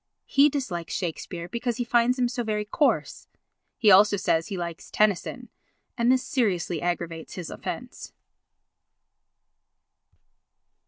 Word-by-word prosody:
He 280 +2 +5
dislikes 215 - -4
Shakespeare 170 0 -4
because 235 +4 -3
he 245 - 0
finds 240 +1 +2
him 250 -1 +2
so 240 0 -3
very 210 -1 -2
coarse. 290 +7 0 0.5
He 215 -4 +5
also 205 +2 +6
says 165 -3 +1
he 195 - -4
likes 170 -2 -6
Tennyson 210 -4 0 0.5
and 235 +1 +3
this 255 -1 +2
seriously 180 - 0
aggravates 170 -2 -3
his 175 -4 -6
offence. - - -7
210 Hz, 120 wpm, -26 LUFS, 175-240 Hz, 0.5 s, also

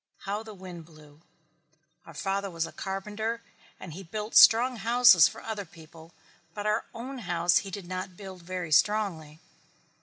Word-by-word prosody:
How 205 +2 -3
the 220 -1 -11
wind 180 -3 -10
blew. 155 -2 -18 0.9
Our 165 - -12
father 195 +3 -2
was 165 -2 -3
a - - -9
carpenter 210 +4 -4 0.4
and 175 -4 -9
he 185 - -8
built 210 +5 -6
strong 245 +2 +7
houses 230 -7 +6
for - - -10
other 220 -2 -4
people 165 -1 -16 0.4
but 205 - -5
our 215 +2 0
own 255 +3 -7
house 175 -5 +1
he 195 - -8
did 195 -1 -7
not 185 0 -6
build 190 -3 -10
very 180 -2 -6
strongly." 160 -4 +1
190 Hz, 160 wpm, -28 LUFS, 170-215 Hz, 0.9 s, strong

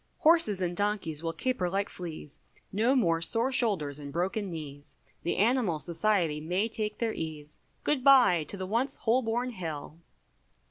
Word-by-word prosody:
Horses 305 - +4
and 175 0 -2
donkeys 200 -6 -1
will 165 -1 -2
caper 250 -2 -1
like 195 +2 -1
fleas, 160 -4 -8 0.3
No 230 +7 +2
more 165 -10 +2
sore 230 +9 +1
shoulders 180 - +1
and 140 -1 -8
broken 190 +5 -2
knees, 145 -4 -9 0.2
The 170 - -1
animal 220 -6 +2
Society 170 -2 0
may 180 +7 0
take 215 -1 -4
their 230 -2 -1
ease, 155 -2 -7 0.2
Good 290 -4 0
bye 250 - +6
to 200 - -5
the 190 - -4
once 235 +8 -1
Holborn 240 +1 0
Hill. 160 -6 -6
190 Hz, 155 wpm, -29 LUFS, 165-230 Hz, 0.3 s, bye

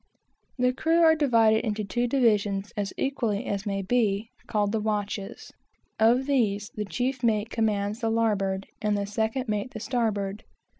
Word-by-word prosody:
The 250 0 +2
crew 325 +5 +2
are 320 -1 +7
divided 230 -8 +3
into 215 -2 -2
two 240 +4 -1
divisions, 210 -6 +1
as 205 -2 -2
equally 240 -5 -1
as 200 +1 -3
may 195 -1 -1
be, 215 0 0 0.2
called 205 -1 0
the 220 - 0
watches. 210 -2 -3 0.5
Of 235 +4 +4
these 215 -7 0
the 210 - -4
chief 250 +7 -2
mate 225 -2 +1
commands 210 -1 0
the 225 -2 0
larboard, 200 -4 0 0.2
and 210 -1 +1
the 200 - -1
second 220 +5 -2
mate 215 +3 -3
the - - -4
starboard. 215 -4 -2
220 Hz, 160 wpm, -26 LUFS, 205-245 Hz, 0.5 s, are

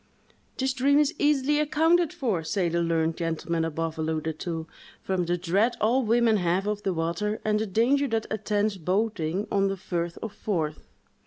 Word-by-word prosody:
"This 265 0 0
dream 275 +2 +3
is 295 -1 +3
easily 295 0 +2
accounted 320 +2 +3
for," 210 -11 -1
say 175 +2 0
the 170 +1 0
learned 165 -1 +1
gentlemen 165 0 -1
above 165 0 -3
alluded 160 0 -2
to, 165 -2 -4 0.3
"from 185 -2 -1
the 175 +1 +1
dread 195 +7 +1
all 240 +5 +3
women 230 -1 +3
have 180 +1 0
of 210 0 -2
the 195 - -1
water, 175 +6 -2
and 210 0 +2
the 220 - -1
danger 250 +8 +2
that 225 -2 -1
attends 210 -1 0
boating 185 0 -1
on 195 -1 +2
the 195 0 -2
firth 170 -2 -3
of 220 -2 -5
Forth!" 165 -8 -3
195 Hz, 175 wpm, -26 LUFS, 170-230 Hz, 0.3 s, dream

